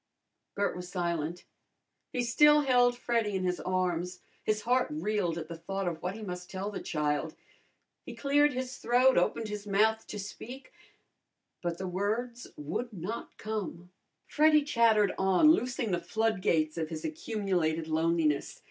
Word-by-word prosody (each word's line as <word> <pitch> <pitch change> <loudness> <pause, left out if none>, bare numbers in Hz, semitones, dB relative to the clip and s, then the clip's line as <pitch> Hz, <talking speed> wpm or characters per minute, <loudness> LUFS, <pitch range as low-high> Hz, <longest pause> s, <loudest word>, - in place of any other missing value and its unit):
Bert 200 0 0
was 180 0 -7
silent. 170 -2 -2 0.7
He 250 - -1
still 295 +5 +5
held 245 -3 +3
Freddy 230 -4 0
in 190 - -1
his 180 -1 0
arms. 180 -1 -1 0.2
His 215 0 0
heart 250 +1 +2
reeled 175 +2 -1
at 160 -2 -5
the 170 - -6
thought 195 +3 -4
of 165 -2 -3
what 180 +2 -3
he 220 - -8
must 180 -2 -6
tell 195 +2 -4
the 200 - -5
child. 150 0 -1 0.7
He - - -9
cleared 290 +1 +3
his 255 0 -4
throat, 250 +2 +4
opened 225 - +1
his 210 0 -6
mouth 220 +2 +2
to 210 - -6
speak, 240 +6 -8 0.9
but 170 -1 -2
the 190 - -4
words 225 +6 -2
would 165 - -4
not 205 +4 -6
come. 195 -5 -5 0.3
Freddy 305 0 +4
chattered 225 -7 +3
on, 190 +11 +5
loosing 250 - 0
the 175 -1 0
flood 220 -1 0
gates 155 -2 +1
of 160 -1 -2
his 160 -2 -5
accumulated 195 - -1
loneliness. 160 -2 0
200 Hz, 155 wpm, -30 LUFS, 175-240 Hz, 0.9 s, still